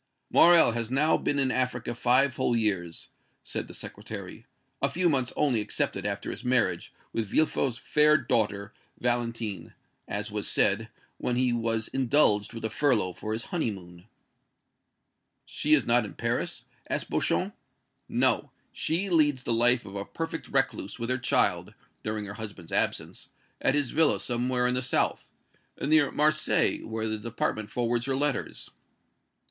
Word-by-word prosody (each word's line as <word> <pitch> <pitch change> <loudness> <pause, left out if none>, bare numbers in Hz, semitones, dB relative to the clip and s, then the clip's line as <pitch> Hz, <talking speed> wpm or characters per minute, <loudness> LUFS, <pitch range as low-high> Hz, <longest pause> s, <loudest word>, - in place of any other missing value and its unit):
"Morrel 170 -6 +7
has 115 -1 -3
now 145 +5 +3
been 145 - 0
in 135 -2 +2
Africa 125 -2 -1
five 125 +2 +2
whole 120 - +1
years," 95 -7 -1 0.3
said - - -5
the - - -11
Secretary - - -8 0.3
"a - - +2
few 180 +1 +1
months 130 -6 +1
only 125 -7 +2
excepted - - -2
after - - -3
his - - -8
marriage 115 -9 +1 0.2
with 115 -2 -1
Villefort's 135 -1 +1
fair 150 +3 +4
daughter, 105 -6 -1 0.3
Valentine, 115 -4 -2 0.3
(as 105 +1 -4
was 105 -1 -3
said) 110 +3 +1 0.3
when 125 - -1
he 125 -1 +2
was 115 -1 -1
indulged 130 -6 +2
with 115 -1 -6
a - - 0
furlough 110 -7 +2
for 110 - -6
his 110 +2 -2
honeymoon." 95 - -4 1.4
"She 150 +1 +2
is 140 - 0
not 120 0 +3
in 105 - -8
Paris?" - - -2 0.3
asked - - -3
Beauchamp. - - 0 0.6
"No; - - +2 0.2
she 170 +5 -1
leads 145 -6 +3
the 115 - -1
life 120 +1 +3
of 100 -1 -9
a 100 - -3
perfect 165 +8 -5
recluse 135 -1 -1
with 115 +1 -2
her 130 - +1
child, - - +1 0.3
during 110 -1 -3
her 100 - -7
husband's 105 -6 -8
absence, - - -2 0.3
at 135 - +2
his 145 -4 0
villa 160 0 +3
somewhere 125 +1 0
in 125 - +2
the 125 - 0
south 130 - 0 0.5
near 150 0 +3
Marseilles, 150 +1 +1
where 110 0 -3
the 110 0 -2
department 110 -1 -3
forwards 120 +1 -1
her 135 - +1
letters." 145 0 -2
120 Hz, 155 wpm, -28 LUFS, 110-135 Hz, 1.4 s, Morrel